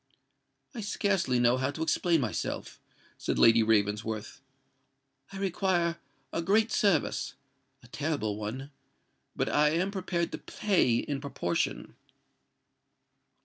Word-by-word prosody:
"I 235 Hz, -, -5 dB
scarcely 195 Hz, -10 st, 0 dB
know 120 Hz, +1 st, +4 dB
how 130 Hz, +1 st, 0 dB
to 150 Hz, +3 st, -3 dB
explain 165 Hz, 0 st, +2 dB
myself," 120 Hz, -5 st, -3 dB, 0.4 s
said -, -, -1 dB
Lady 115 Hz, 0 st, +6 dB
Ravensworth. 105 Hz, +1 st, 0 dB, 0.9 s
"I 195 Hz, -, -7 dB
require 185 Hz, -3 st, 0 dB, 0.4 s
a 165 Hz, -, 0 dB
great 215 Hz, +5 st, +2 dB
service—a 135 Hz, -, -2 dB
terrible 140 Hz, -8 st, -2 dB
one; 120 Hz, +7 st, -5 dB, 0.6 s
but -, -, 0 dB
I 150 Hz, 0 st, +3 dB
am 175 Hz, +5 st, 0 dB
prepared 180 Hz, -3 st, -2 dB
to -, -, -5 dB
pay 185 Hz, -, +1 dB
in 140 Hz, +2 st, -3 dB
proportion." 125 Hz, -11 st, -2 dB
145 Hz, 110 wpm, -29 LUFS, 120-180 Hz, 0.9 s, Lady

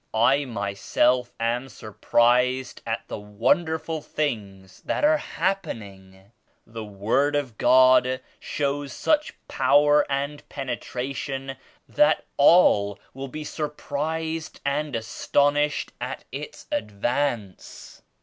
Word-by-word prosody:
I 135 Hz, +6 st, +3 dB
myself 120 Hz, +3 st, 0 dB
am 120 Hz, +3 st, -1 dB
sur 110 Hz, -2 st, -11 dB
prised 125 Hz, +4 st, +2 dB
at 115 Hz, 0 st, -3 dB
the -, -, -5 dB
wonderful 160 Hz, -, 0 dB
things 100 Hz, -12 st, -4 dB
that -, -, -2 dB
are 310 Hz, +1 st, +5 dB
happen 190 Hz, -, -2 dB
ing. 95 Hz, 0 st, -16 dB, 0.3 s
The 115 Hz, 0 st, -7 dB
Word 110 Hz, +8 st, 0 dB
of 135 Hz, -6 st, -2 dB
God 130 Hz, 0 st, +5 dB, 0.2 s
shows 140 Hz, -2 st, -2 dB
such 305 Hz, -1 st, 0 dB
power 145 Hz, +1 st, +4 dB
and 140 Hz, +2 st, -2 dB
penetration 135 Hz, +1 st, -4 dB, 0.3 s
that 295 Hz, -, +3 dB
all 105 Hz, -, +5 dB, 0.2 s
will 135 Hz, +1 st, -6 dB
be 155 Hz, +3 st, -7 dB
surprised 160 Hz, +2 st, -4 dB
and 145 Hz, 0 st, -1 dB
as 115 Hz, -1 st, -3 dB
tonished 145 Hz, +3 st, +1 dB
at -, -, -5 dB
Its -, -, -7 dB
advance." 105 Hz, 0 st, -3 dB
130 Hz, 110 wpm, -25 LUFS, 115-145 Hz, 0.3 s, are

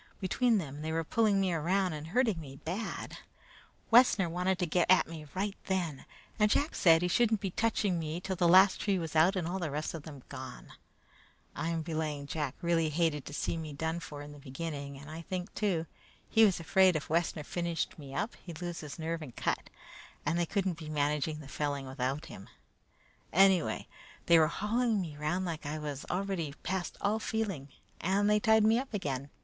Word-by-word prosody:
Between 225 Hz, +4 st, +2 dB
them 150 Hz, -5 st, -4 dB
they 160 Hz, +1 st, -3 dB
were 165 Hz, 0 st, 0 dB
pulling 210 Hz, +2 st, +2 dB
me 190 Hz, -2 st, +1 dB
around 180 Hz, +3 st, +1 dB
and 155 Hz, 0 st, -6 dB
hurting 215 Hz, -2 st, +1 dB
me 135 Hz, -3 st, -9 dB
bad. 180 Hz, +10 st, -5 dB, 0.7 s
Wessner 225 Hz, -6 st, +6 dB
wanted 180 Hz, +2 st, 0 dB
to 180 Hz, -, 0 dB
get 175 Hz, +2 st, +1 dB
at 185 Hz, -, +6 dB
me 155 Hz, -2 st, -8 dB
right 200 Hz, +1 st, -1 dB
then, 175 Hz, -8 st, -2 dB, 0.3 s
and 210 Hz, 0 st, +5 dB
Jack 290 Hz, +8 st, +2 dB
said 165 Hz, -1 st, +5 dB
he -, -, +2 dB
shouldn't 220 Hz, +3 st, +3 dB
be 195 Hz, -2 st, -3 dB
touching 205 Hz, -4 st, +1 dB
me 160 Hz, +1 st, -3 dB
till 190 Hz, +1 st, -3 dB
the 175 Hz, -1 st, +3 dB
last 190 Hz, +3 st, +6 dB
tree 200 Hz, -2 st, +1 dB
was 165 Hz, -3 st, -4 dB
out 170 Hz, +5 st, +5 dB
and 175 Hz, -3 st, -1 dB
all 185 Hz, +2 st, -2 dB
the 170 Hz, -4 st, -2 dB
rest 150 Hz, +2 st, -3 dB
of 165 Hz, -, -5 dB
them 145 Hz, -4 st, -10 dB
gone. 130 Hz, -2 st, -8 dB, 0.9 s
I'm 165 Hz, -1 st, -1 dB
belaying 155 Hz, -3 st, -3 dB
Jack 145 Hz, -2 st, -3 dB
really 165 Hz, -2 st, +2 dB
hated 155 Hz, -2 st, 0 dB
to 145 Hz, -, -7 dB
see 165 Hz, -, -1 dB
me 155 Hz, -2 st, -5 dB
done 160 Hz, +4 st, -2 dB
for 145 Hz, -3 st, -8 dB
in 145 Hz, -, -10 dB
the 145 Hz, -, -12 dB
beginning; 140 Hz, 0 st, -6 dB
and 145 Hz, +2 st, -11 dB
I 160 Hz, +1 st, -6 dB
think, 180 Hz, +3 st, -5 dB
too, 185 Hz, -6 st, 0 dB, 0.4 s
he 220 Hz, 0 st, +6 dB
was 195 Hz, -4 st, +2 dB
afraid 185 Hz, +2 st, +4 dB
if 155 Hz, -, -2 dB
Wessner 165 Hz, -1 st, 0 dB
finished 170 Hz, 0 st, -3 dB
me 140 Hz, -2 st, -9 dB
then 210 Hz, -, 0 dB, 0.2 s
he'd 170 Hz, -3 st, -8 dB
lose 175 Hz, -1 st, -4 dB
his 150 Hz, -2 st, -7 dB
nerve 165 Hz, 0 st, -3 dB
and 130 Hz, -6 st, -9 dB
cut, -, -, -2 dB, 0.6 s
and 170 Hz, -, +1 dB
they 170 Hz, -, +1 dB
couldn't 190 Hz, -3 st, -1 dB
be 155 Hz, -2 st, -7 dB
managing 150 Hz, +1 st, 0 dB
the 145 Hz, -, -11 dB
felling 140 Hz, -1 st, -2 dB
without 130 Hz, +3 st, -2 dB
him; 95 Hz, -, -11 dB, 0.8 s
anyway, 190 Hz, -2 st, +4 dB, 0.4 s
they 170 Hz, -1 st, +7 dB
were 155 Hz, -, +5 dB
hauling 225 Hz, +4 st, 0 dB
me 165 Hz, -5 st, -4 dB
round 155 Hz, +5 st, -1 dB
like 160 Hz, -4 st, -4 dB
I 150 Hz, +2 st, -3 dB
was 145 Hz, -2 st, -5 dB
already 180 Hz, -5 st, -2 dB
past 185 Hz, 0 st, -3 dB
all 210 Hz, +2 st, +1 dB
feeling, 200 Hz, -12 st, -2 dB, 0.3 s
and 195 Hz, +4 st, +2 dB
they 210 Hz, 0 st, +4 dB
tied 220 Hz, 0 st, +4 dB
me 220 Hz, +2 st, +5 dB
up 260 Hz, -4 st, -5 dB
again. 140 Hz, -7 st, -3 dB
165 Hz, 200 wpm, -31 LUFS, 150-190 Hz, 0.9 s, they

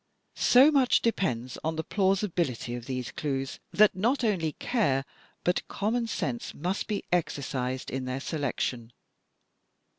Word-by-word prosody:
So 265 Hz, +5 st, +6 dB
much 270 Hz, -4 st, +4 dB
depends 130 Hz, -, -1 dB
on 160 Hz, +1 st, -1 dB
the 160 Hz, -, -2 dB
plausibility 185 Hz, -, 0 dB
of 120 Hz, -1 st, -6 dB
these 130 Hz, -2 st, -3 dB
clues, 135 Hz, -3 st, -3 dB
that 210 Hz, 0 st, +5 dB
not 240 Hz, +8 st, +1 dB
only 175 Hz, -9 st, +1 dB
care 140 Hz, -, 0 dB, 0.4 s
but 180 Hz, -, 0 dB
common 230 Hz, +4 st, -1 dB
sense 130 Hz, -, -3 dB
must 180 Hz, +6 st, -2 dB
be 210 Hz, -2 st, -2 dB
exercised 130 Hz, -6 st, -1 dB
in 130 Hz, 0 st, -3 dB
their 130 Hz, +1 st, -3 dB
selection. 130 Hz, -5 st, -3 dB
160 Hz, 130 wpm, -28 LUFS, 130-210 Hz, 0.4 s, So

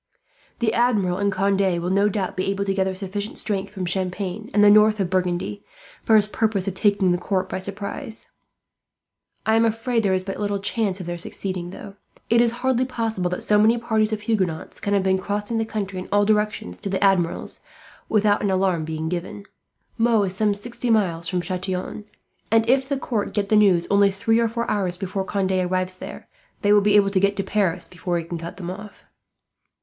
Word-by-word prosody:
The 225 Hz, -2 st, 0 dB
Admiral 210 Hz, -7 st, +2 dB
and 200 Hz, 0 st, +1 dB
Conde 195 Hz, +1 st, +1 dB, 0.2 s
will 175 Hz, +2 st, -2 dB
no 200 Hz, +2 st, +3 dB
doubt 195 Hz, -2 st, -2 dB
be 185 Hz, -, -2 dB
able 200 Hz, 0 st, -1 dB
to 195 Hz, -, 0 dB
gather 190 Hz, -1 st, 0 dB
sufficient 200 Hz, +2 st, -5 dB
strength, 200 Hz, -2 st, -2 dB
from 190 Hz, -3 st, -4 dB
Champagne 185 Hz, +3 st, -3 dB
and 205 Hz, 0 st, +4 dB
the 205 Hz, -, +8 dB
north 215 Hz, 0 st, +5 dB
of 185 Hz, -2 st, -1 dB
Burgundy, 185 Hz, +2 st, -1 dB, 0.4 s
for 220 Hz, -, +4 dB
his 210 Hz, -1 st, +5 dB
purpose 210 Hz, -3 st, 0 dB
of 195 Hz, -, -1 dB
taking 200 Hz, -1 st, +2 dB
the 175 Hz, -, +1 dB
court 185 Hz, +1 st, -1 dB
by 190 Hz, -, -4 dB
surprise. 200 Hz, +3 st, -5 dB, 1.1 s
"I 220 Hz, -, +3 dB
am 225 Hz, -, +4 dB
afraid 230 Hz, +1 st, +1 dB
there 195 Hz, -3 st, +2 dB
is 185 Hz, -, -1 dB
but 195 Hz, 0 st, -5 dB
little 205 Hz, -1 st, -1 dB
chance 200 Hz, -1 st, -1 dB
of 180 Hz, -, -6 dB
their 175 Hz, 0 st, -4 dB
succeeding. 180 Hz, 0 st, -4 dB, 0.6 s
It 235 Hz, 0 st, +6 dB
is 240 Hz, -, +4 dB
hardly 250 Hz, +1 st, 0 dB
possible 225 Hz, -7 st, -2 dB
that 180 Hz, -, -3 dB
so 210 Hz, 0 st, +3 dB
many 220 Hz, +3 st, +4 dB
parties 220 Hz, -2 st, 0 dB
of 215 Hz, -1 st, -2 dB
Huguenots 190 Hz, -7 st, -2 dB
can 205 Hz, 0 st, 0 dB
have 195 Hz, -, +2 dB
been 190 Hz, 0 st, +2 dB
crossing 205 Hz, +4 st, -2 dB
the 225 Hz, -, 0 dB
country 200 Hz, -4 st, -4 dB
in 185 Hz, -, -8 dB
all 205 Hz, 0 st, +3 dB
directions 210 Hz, -, 0 dB
to -, -, -5 dB
the 195 Hz, +1 st, -1 dB
Admiral's, 185 Hz, -4 st, +1 dB, 0.5 s
without 210 Hz, -1 st, +3 dB
an 205 Hz, -, 0 dB
alarm 185 Hz, -3 st, +1 dB
being 160 Hz, 0 st, -4 dB
given. 180 Hz, +4 st, -5 dB, 0.5 s
Meaux 225 Hz, -2 st, +3 dB
is 190 Hz, -1 st, -3 dB
some 210 Hz, 0 st, +1 dB
sixty 240 Hz, +3 st, -5 dB
miles 175 Hz, -7 st, +1 dB
from 180 Hz, -2 st, -1 dB
Chatillon, 185 Hz, +3 st, -4 dB, 0.4 s
and 225 Hz, 0 st, +3 dB
if 265 Hz, +2 st, +2 dB
the 280 Hz, -, 0 dB
court 230 Hz, -5 st, -2 dB
get 200 Hz, -2 st, 0 dB
the 215 Hz, -, +4 dB
news 195 Hz, -5 st, +4 dB
only 200 Hz, 0 st, +5 dB
three 225 Hz, +4 st, +1 dB
or 230 Hz, -, +3 dB
four 235 Hz, +1 st, -3 dB
hours 185 Hz, -4 st, -1 dB
before 190 Hz, +1 st, -3 dB
Conde 190 Hz, -1 st, -1 dB
arrives 185 Hz, 0 st, 0 dB
there, -, -, -9 dB, 0.4 s
they 205 Hz, 0 st, +5 dB
will 205 Hz, -, +6 dB
be 205 Hz, +1 st, +3 dB
able 200 Hz, -1 st, +5 dB
to 195 Hz, -, +2 dB
get 200 Hz, +1 st, +2 dB
to 195 Hz, -, -1 dB
Paris 190 Hz, -3 st, 0 dB
before 180 Hz, -1 st, -3 dB
he 170 Hz, -, -3 dB
can 170 Hz, 0 st, -6 dB
cut 170 Hz, +3 st, -7 dB
them 180 Hz, -2 st, -5 dB
off." 205 Hz, +2 st, -10 dB
200 Hz, 210 wpm, -23 LUFS, 185-215 Hz, 1.1 s, the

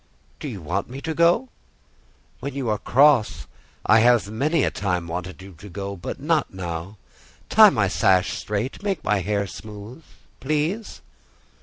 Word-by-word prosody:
"Do -, -, -5 dB
you 105 Hz, -, -7 dB
want 95 Hz, +8 st, -2 dB
me 130 Hz, +2 st, -7 dB
to 160 Hz, -, -3 dB
go?" 170 Hz, -, +3 dB, 0.9 s
"When 140 Hz, -1 st, -6 dB
you 135 Hz, -4 st, -2 dB
are 105 Hz, -1 st, 0 dB
cross, 110 Hz, -, +3 dB, 0.4 s
I 110 Hz, +1 st, +6 dB
have 120 Hz, -3 st, +3 dB
many 145 Hz, +7 st, +1 dB
a -, -, +1 dB
time 90 Hz, -4 st, -2 dB
wanted 90 Hz, +2 st, -6 dB
you 95 Hz, 0 st, -12 dB
to 105 Hz, -, -11 dB
go, 100 Hz, +1 st, -5 dB
but 85 Hz, -, -6 dB
not 155 Hz, +3 st, 0 dB
now. 90 Hz, +1 st, -6 dB, 0.5 s
Tie -, -, +8 dB
my -, -, +1 dB
sash 95 Hz, 0 st, +2 dB
straight; 105 Hz, -, -4 dB
make 195 Hz, -6 st, -2 dB
my 105 Hz, 0 st, +1 dB
hair 100 Hz, +2 st, -1 dB
smooth, 105 Hz, -, -10 dB, 0.4 s
please." 155 Hz, +10 st, -2 dB
105 Hz, 160 wpm, -23 LUFS, 95-145 Hz, 0.9 s, Tie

